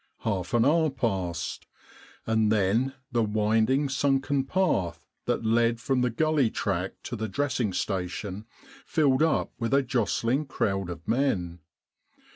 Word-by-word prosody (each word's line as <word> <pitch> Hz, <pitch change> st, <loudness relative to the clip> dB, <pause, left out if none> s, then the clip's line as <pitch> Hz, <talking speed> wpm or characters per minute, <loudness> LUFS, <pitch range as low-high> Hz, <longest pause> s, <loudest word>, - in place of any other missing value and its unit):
Half 100 Hz, -1 st, -2 dB
an 115 Hz, 0 st, +4 dB
hour 160 Hz, +2 st, +3 dB
passed. 95 Hz, -, -3 dB, 0.6 s
And 110 Hz, -1 st, +2 dB
then 110 Hz, +6 st, +1 dB, 0.2 s
the 120 Hz, -1 st, +2 dB
winding 110 Hz, +6 st, +2 dB
sunken 135 Hz, 0 st, +1 dB
path 95 Hz, -, 0 dB, 0.2 s
that -, -, 0 dB
led 115 Hz, +1 st, +2 dB
from 130 Hz, +1 st, 0 dB
the 125 Hz, -, +2 dB
gully 145 Hz, +1 st, +2 dB
track 95 Hz, -3 st, -2 dB
to 120 Hz, -, -5 dB
the 110 Hz, 0 st, -3 dB
dressing 130 Hz, -2 st, -1 dB
station 95 Hz, +3 st, -3 dB, 0.4 s
filled 140 Hz, -4 st, +2 dB
up 160 Hz, 0 st, +1 dB
with 115 Hz, +3 st, +1 dB
a 140 Hz, -, +4 dB
jostling 125 Hz, +3 st, 0 dB
crowd 95 Hz, -7 st, -1 dB
of 85 Hz, -1 st, -8 dB
men. 95 Hz, -10 st, 0 dB
115 Hz, 135 wpm, -27 LUFS, 100-135 Hz, 0.6 s, an